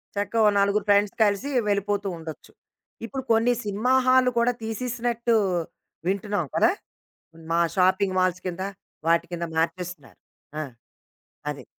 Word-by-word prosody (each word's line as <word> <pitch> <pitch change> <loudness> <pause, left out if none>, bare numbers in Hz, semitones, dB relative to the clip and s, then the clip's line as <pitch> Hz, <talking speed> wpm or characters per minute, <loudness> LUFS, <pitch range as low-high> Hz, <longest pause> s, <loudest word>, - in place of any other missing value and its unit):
చక్కగా 205 +3 0
ఓ - - +7
నలుగురు 200 +1 +2
ఫ్రెండ్స్ 205 0 +4
కలిసి 205 +6 +1 0.2
వెళ్ళిపోతూ 205 0 0
ఉండొచ్చు. 160 -1 -9 0.5
ఇప్పుడు 265 +3 -5
కొన్ని 230 +2 +4
సినిమా 210 +5 0
హాల్లు 255 0 +5
కూడా 235 +1 +3
తీసేసినట్టు 235 +1 -1 0.7
వింటున్నాం 200 -3 -1
కదా! - - +5 0.8
మా 170 - +3 0.2
షాపింగ్ 190 +1 +3
మాల్స్ 185 0 +1
కింద, 180 0 -3 0.5
వాటి 170 0 +3
కింద 170 0 -2
మార్చేస్తున్నారు. 170 -2 -3 0.4
ఆ! - - -1 0.9
అది. - - -7
200 Hz, 120 wpm, -25 LUFS, 185-230 Hz, 0.9 s, ఓ